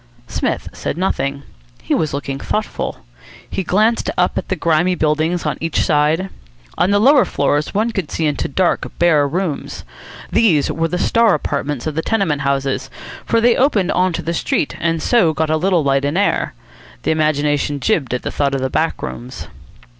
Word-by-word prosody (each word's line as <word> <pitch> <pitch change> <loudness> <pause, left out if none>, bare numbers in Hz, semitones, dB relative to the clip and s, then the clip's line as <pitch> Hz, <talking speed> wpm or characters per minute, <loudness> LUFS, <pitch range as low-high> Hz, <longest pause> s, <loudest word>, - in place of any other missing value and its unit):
Psmith - - -2
said - - -4
nothing. 140 -6 -1 0.4
He - - -1
was 155 - 0
looking 140 -1 -4
thoughtful. 215 +7 -3 0.4
He - - -3
glanced 215 +6 +1
up 180 - +2
at - - -3
the 190 - 0
grimy 170 +2 +2
buildings 155 +2 0
on 150 - -2
each 165 0 0
side. 155 +5 +1 0.4
On 180 - +2
the 200 - +3
lower 265 +5 +6
floors 145 +3 -1
one 220 +3 +1
could 195 -8 -3
see 160 - -2
into 150 - -1
dark, 175 +5 0
bare 155 -4 +4
rooms. 170 0 -3 0.5
These 170 -11 +3
were 165 +1 0
the 180 - -2
star 230 +1 +3
apartments 145 -3 -3
of 155 - -2
the 160 - -1
tenement 185 -9 0
houses, 135 -1 -1 0.4
for 230 - +3
they 235 +1 +4
opened 230 -9 +2
on 185 +1 +2
to - - -3
the 170 - -2
street, 155 - -1
and 165 -1 -1
so 180 -11 +3
got 155 +1 0
a - - +3
little 175 0 +2
light 135 0 +2
and 145 +4 0
air. 205 - 0 0.5
The - - +1
imagination 150 -2 +1
jibbed 145 - 0
at 125 - -5
the - - -3
thought 140 -1 0
of 135 - -2
the 130 0 -2
back - - -1
rooms. 60 0 -7
160 Hz, 185 wpm, -18 LUFS, 145-190 Hz, 0.5 s, lower